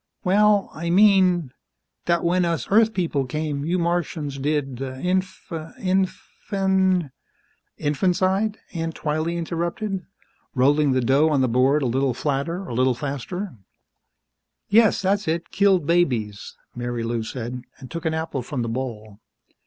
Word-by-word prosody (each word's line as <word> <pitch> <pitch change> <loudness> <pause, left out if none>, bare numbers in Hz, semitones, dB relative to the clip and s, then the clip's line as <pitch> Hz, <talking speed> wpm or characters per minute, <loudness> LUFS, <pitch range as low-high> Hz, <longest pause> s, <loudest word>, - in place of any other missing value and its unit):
"Well, 205 +2 +3
I 170 +2 -4
mean, 185 -5 +4 0.5
that 170 0 +1
when 180 +1 +2
us 170 -1 -1
Earth 220 +2 +5
people 165 -8 0
came, 150 +1 -3
you 170 +4 0
Martians 165 -5 -2
did 135 -3 -1
inf... 180 +9 -2
infan 185 +1 -1 0.3
..." - - -39 0.2
"Infanticide?" 190 +7 +1 0.2
Aunt 165 -1 -3
Twylee 155 +2 -1
interrupted, 175 +4 -3 0.5
rolling 140 +2 +3
the 130 - +2
dough 135 +6 +3
on 145 -3 +2
the 130 - +3
board 130 +5 +3
a - - +1
little 130 +1 +1
flatter, 150 +8 -2
a 120 - -6
little 130 +1 +2
faster. 145 - -4 1.2
"Yes, 220 -2 +4
that's 200 +1 +1
it 165 +1 -2
killed 195 -5 +3
babies," 125 -12 0 0.2
Marilou 120 -1 -2
said, 125 +2 -5 0.2
and 130 - -12
took 165 -1 -5
an 160 -1 0
apple 160 -4 -3
from 125 0 -3
the 115 - -3
bowl. 110 -4 -5
160 Hz, 135 wpm, -23 LUFS, 135-185 Hz, 1.2 s, Earth